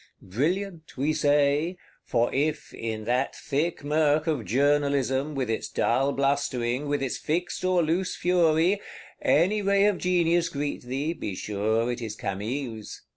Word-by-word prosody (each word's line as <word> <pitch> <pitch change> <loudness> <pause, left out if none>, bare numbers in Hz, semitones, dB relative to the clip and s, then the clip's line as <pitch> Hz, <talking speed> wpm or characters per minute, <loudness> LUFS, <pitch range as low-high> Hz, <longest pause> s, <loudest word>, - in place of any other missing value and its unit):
Brilliant, 165 - -2
we 145 +4 +1
say: 145 +4 +2 0.3
for 120 +1 0
if, 150 +2 -1
in 110 -1 -4
that 125 +4 0
thick 150 +2 -2
murk 150 0 +2
of 150 -9 -1
Journalism, 140 +1 +1
with 130 -3 -1
its 110 0 -2
dull 135 +4 +1
blustering, 140 -2 0
with 145 -1 0
its 130 - -2
fixed 175 +4 -2
or 185 -2 +3
loose 175 +4 0
fury, 175 +2 +2 0.4
any 190 +8 +3
ray 200 0 +3
of 205 -3 +2
genius 175 -2 +2
greet 145 0 -3
thee, 135 +6 -2
be 105 - -5
sure 110 +4 0
it 120 0 -5
is 110 -2 -5
Camille's. 110 +3 -5
145 Hz, 145 wpm, -26 LUFS, 125-165 Hz, 0.4 s, or